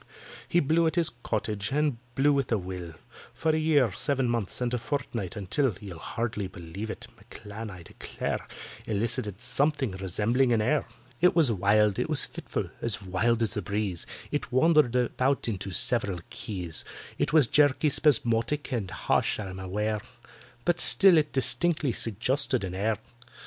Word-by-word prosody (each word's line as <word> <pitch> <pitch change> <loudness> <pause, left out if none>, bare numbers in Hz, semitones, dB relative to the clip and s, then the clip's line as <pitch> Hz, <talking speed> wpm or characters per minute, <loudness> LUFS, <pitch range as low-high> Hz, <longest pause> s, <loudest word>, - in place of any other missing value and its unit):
He 175 - +3
blew 165 +2 +2
at 160 - -1
his 170 -3 +1
"Cottage," 105 -2 -2
and 145 -4 0 0.2
blew 145 +2 +3
with 140 -3 -1
a 115 - +3
will, 90 -3 -7 0.4
For 160 - +1
a - - 0
year, 145 -7 +3
seven 135 +5 0
months, 115 -5 -2
and 125 -1 -1
a 125 - 0
fortnight, 115 - -4
until 105 +4 0
(You'll 95 -5 -9
hardly 110 -2 -3
believe 95 +4 -8
it) - - -6
M'CLAN, 110 0 -9
I 90 -3 -10
declare, - - -4 0.5
Elicited 105 -2 -2
something 135 0 +2
resembling 105 +7 0
an 115 - +2
air. 125 +5 +1 0.3
It 180 - +4
was 155 -8 +5
wild—it 105 +1 +2
was - - +6
fitful—as 110 -3 -4
wild 110 +5 +1
as 110 - +1
the 105 - -2
breeze— 100 -3 -3 0.2
It - - -3
wandered 150 -1 +4
about 130 +2 +1
into 100 -3 -3
several 110 -4 0
keys; 90 -6 -4 0.4
It - - +1
was 155 -3 +6
jerky, 145 +3 +3
spasmodic, 145 -1 +1
and 105 -6 -2
harsh, - - 0
I'm 95 -3 -6
aware; 105 +3 -2 0.6
But 175 -1 +2
still 185 -3 +6
it 150 -1 -2
distinctly 150 +2 +2
suggested 120 +3 +1
an 90 -1 -4
air. 105 +3 0
115 Hz, 155 wpm, -27 LUFS, 100-140 Hz, 0.6 s, was